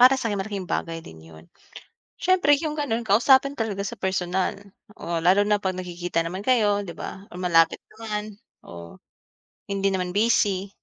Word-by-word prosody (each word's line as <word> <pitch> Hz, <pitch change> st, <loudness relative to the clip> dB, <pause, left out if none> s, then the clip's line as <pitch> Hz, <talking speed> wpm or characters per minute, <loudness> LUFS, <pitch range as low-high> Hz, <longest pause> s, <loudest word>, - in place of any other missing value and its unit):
para 255 Hz, +2 st, +8 dB
sakin 225 Hz, -6 st, -2 dB
malaking 195 Hz, -1 st, -4 dB
bagay 165 Hz, -1 st, -3 dB
din 80 Hz, -, -12 dB
yun. 80 Hz, 0 st, -15 dB, 0.8 s
Siyempre 370 Hz, -5 st, +3 dB
yung 305 Hz, -2 st, -3 dB
gano'n, 255 Hz, -6 st, -1 dB
kausapin 265 Hz, +6 st, +4 dB
talaga 215 Hz, -3 st, -2 dB
sa 200 Hz, -, -5 dB
personal 185 Hz, -1 st, -1 dB, 0.4 s
o 170 Hz, -5 st, -3 dB
lalo 185 Hz, +3 st, +5 dB
na 210 Hz, 0 st, +2 dB
pag 190 Hz, -2 st, -2 dB
nagkikita 175 Hz, -2 st, -3 dB
naman 180 Hz, +4 st, -5 dB
kayo 210 Hz, -5 st, +2 dB
diba 190 Hz, +2 st, -8 dB
o -, -, -12 dB
malapit 165 Hz, -2 st, +3 dB, 0.2 s
naman. 215 Hz, -2 st, -5 dB, 0.3 s
Oh. 85 Hz, -1 st, -11 dB, 0.7 s
Hindi 195 Hz, 0 st, +1 dB
naman 180 Hz, -1 st, -1 dB
busy. 205 Hz, -2 st, +2 dB
200 Hz, 155 wpm, -24 LUFS, 180-225 Hz, 0.8 s, para